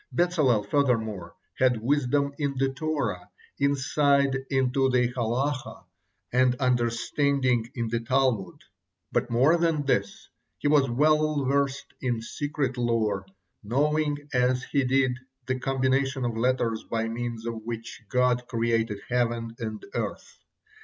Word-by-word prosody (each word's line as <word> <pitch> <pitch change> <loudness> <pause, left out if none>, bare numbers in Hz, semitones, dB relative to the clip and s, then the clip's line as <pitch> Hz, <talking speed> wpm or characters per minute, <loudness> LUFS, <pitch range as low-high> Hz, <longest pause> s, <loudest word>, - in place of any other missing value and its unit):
Bezalel, 155 -11 +2
furthermore, 110 -10 0 0.2
had 125 -3 +3
wisdom 140 +1 +1
in 140 -2 -1
the 135 +1 +2
Torah, 135 - -3 0.3
insight 140 0 +2
into 135 0 +2
the 125 -1 +2
Halakah, 125 -1 -2 0.5
and 125 0 +4
understanding 125 0 +1
in 120 -2 -2
the 115 +1 0
Talmud, 125 -4 0 0.5
but - - 0
more 130 +8 +4
than 165 -4 +1
this, 100 -7 -1 0.3
he - - -1
was 145 -3 +4
well 150 +2 +2
versed 140 0 0
in 120 -3 0
secret 135 +2 -3
lore, 110 -5 0 0.4
knowing 145 +6 +1 0.2
as 125 0 +2
he 140 +1 0
did 130 -1 +2 0.3
the 130 0 -2
combination 135 0 0
of 120 -2 -2
letters 115 -2 0
by 115 0 -2
means 115 0 -4
of 115 -1 -4
which 115 0 -6
God 125 -1 +2
created 115 -3 0
heaven 120 -2 -1
and 110 -2 -5
earth. - - -5
125 Hz, 125 wpm, -26 LUFS, 115-140 Hz, 0.5 s, and